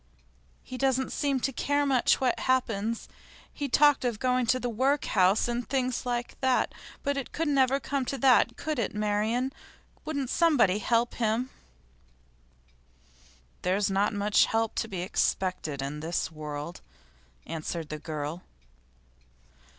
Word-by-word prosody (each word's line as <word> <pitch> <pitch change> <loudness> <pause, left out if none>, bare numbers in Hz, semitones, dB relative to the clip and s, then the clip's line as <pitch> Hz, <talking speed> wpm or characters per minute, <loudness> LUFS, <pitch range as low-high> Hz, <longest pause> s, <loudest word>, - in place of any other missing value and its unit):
'He 255 - -8
doesn't 265 -1 +1
seem 275 -3 0
to 270 - -1
care 285 +4 +1
much 265 -3 +3
what 255 -2 +1
happens. 230 -4 0 0.5
He 285 -2 -4
talked 290 +2 +5
of 240 -3 -1
going 250 0 +1
to 255 - +3
the 245 - -2
workhouse, 225 -6 +2
and 240 0 -3
things 255 -2 -1
like 240 0 -3
that. 260 -1 +2 0.3
But 280 0 0
it 275 - -4
couldn't 295 -3 0
ever 265 +1 +3
come 275 +1 -2
to 275 - -3
that, 250 -2 +4
could 310 -4 -3
it, 210 -2 -2
Marian? 215 +5 0 0.5
Wouldn't 280 -5 -3
somebody 275 - +3
help 235 +2 +1
him?' 235 +3 -1 2.1
'There's 195 +2 +1
not 195 +2 +2
much 205 0 +3
help 225 0 0
to - - 0
be 185 -5 -4
expected 180 -6 -1
in 145 +2 -4
this 165 +1 -2
world,' 150 +1 -6 0.6
answered 160 0 -5
the 155 - -5
girl. 155 +2 -5
240 Hz, 140 wpm, -28 LUFS, 195-265 Hz, 2.1 s, talked